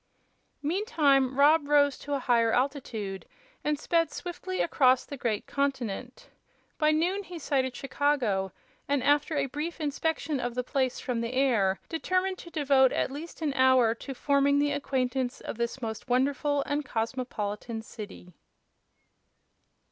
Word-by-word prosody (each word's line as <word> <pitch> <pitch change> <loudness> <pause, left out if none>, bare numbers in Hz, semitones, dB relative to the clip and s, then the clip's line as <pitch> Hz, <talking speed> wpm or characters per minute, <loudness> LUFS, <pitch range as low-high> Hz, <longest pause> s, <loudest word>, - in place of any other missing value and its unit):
Meantime 285 - +2
Rob 295 +1 +5
rose 285 -2 +4
to 290 0 -4
a - - -1
higher 235 -3 +3
altitude, 235 -8 -2 0.4
and 300 0 0
sped 330 +2 +1
swiftly 370 +1 -5
across 260 -5 +3
the 285 - -7
great 230 -5 -2
continent. 280 - -3 0.5
By 305 -1 +4
noon 345 +6 +1
he 360 -3 -9
sighted 265 -4 -1
Chicago, 250 -9 0 0.4
and 280 -2 +1
after 295 +1 +2
a 280 - +2
brief 300 +5 -5
inspection 300 -1 -1
of 245 -1 -3
the 250 - -1
place 260 0 -1
from 245 -3 -2
the 230 +2 -3
air 225 -8 +2
determined 370 +3 -1
to 340 - -10
devote 275 -5 +3
at - - 0
least 320 +3 -7
an 290 -3 0
hour 260 -3 +4
to 270 +3 -8
forming 280 +1 +2
the 290 0 +2
acquaintance 260 -3 -1
of - - -6
this 235 +2 -2
most 220 +2 -5
wonderful 280 +3 +1
and 290 +1 -1
cosmopolitan 225 -2 -3
city. 205 -5 -10
275 Hz, 145 wpm, -28 LUFS, 245-295 Hz, 0.5 s, Rob